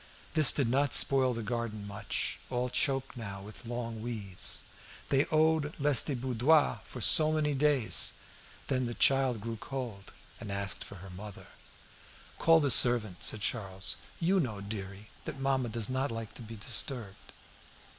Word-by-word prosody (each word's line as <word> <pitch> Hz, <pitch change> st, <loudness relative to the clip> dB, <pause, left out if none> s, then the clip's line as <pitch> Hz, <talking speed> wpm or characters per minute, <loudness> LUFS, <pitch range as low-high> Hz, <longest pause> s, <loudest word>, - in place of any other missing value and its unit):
This 155 Hz, -3 st, +6 dB
did 140 Hz, -5 st, -1 dB
not 140 Hz, +4 st, +2 dB
spoil 130 Hz, -3 st, +5 dB
the 115 Hz, -, -6 dB
garden 110 Hz, -2 st, -5 dB
much, 100 Hz, -1 st, -5 dB
all 125 Hz, 0 st, -3 dB
choked 135 Hz, +1 st, -2 dB
now 100 Hz, -5 st, -8 dB
with 105 Hz, +3 st, -13 dB
long 115 Hz, -2 st, -6 dB
weeds. 105 Hz, -6 st, -3 dB, 0.5 s
They 140 Hz, +1 st, +2 dB
owed 155 Hz, -1 st, 0 dB
Lestiboudois 135 Hz, 0 st, +2 dB
for 125 Hz, -, -10 dB
so 155 Hz, +8 st, +6 dB
many 150 Hz, -2 st, -1 dB
days. 140 Hz, -4 st, +4 dB, 0.5 s
Then 130 Hz, -2 st, -2 dB
the 120 Hz, -, -6 dB
child 135 Hz, -5 st, +1 dB
grew 115 Hz, +1 st, -6 dB
cold 120 Hz, -6 st, -8 dB, 0.3 s
and 105 Hz, -, -8 dB
asked 100 Hz, 0 st, -3 dB
for -, -, -12 dB
her 95 Hz, -, -11 dB
mother. 100 Hz, +2 st, -11 dB, 0.9 s
"Call 165 Hz, 0 st, +4 dB
the 145 Hz, -3 st, +1 dB
servant," 115 Hz, -8 st, +6 dB
said 110 Hz, -, +2 dB
Charles. 95 Hz, -4 st, 0 dB, 0.2 s
"You 185 Hz, +3 st, +1 dB
know, 115 Hz, -, -3 dB
dearie, 100 Hz, 0 st, -8 dB
that 135 Hz, -, -7 dB
mamma 135 Hz, -2 st, -1 dB
does 110 Hz, -1 st, -3 dB
not 130 Hz, +2 st, -2 dB
like 115 Hz, -2 st, -7 dB
to -, -, -11 dB
be 115 Hz, 0 st, -10 dB
disturbed." 110 Hz, -1 st, -3 dB
120 Hz, 155 wpm, -29 LUFS, 105-135 Hz, 0.9 s, This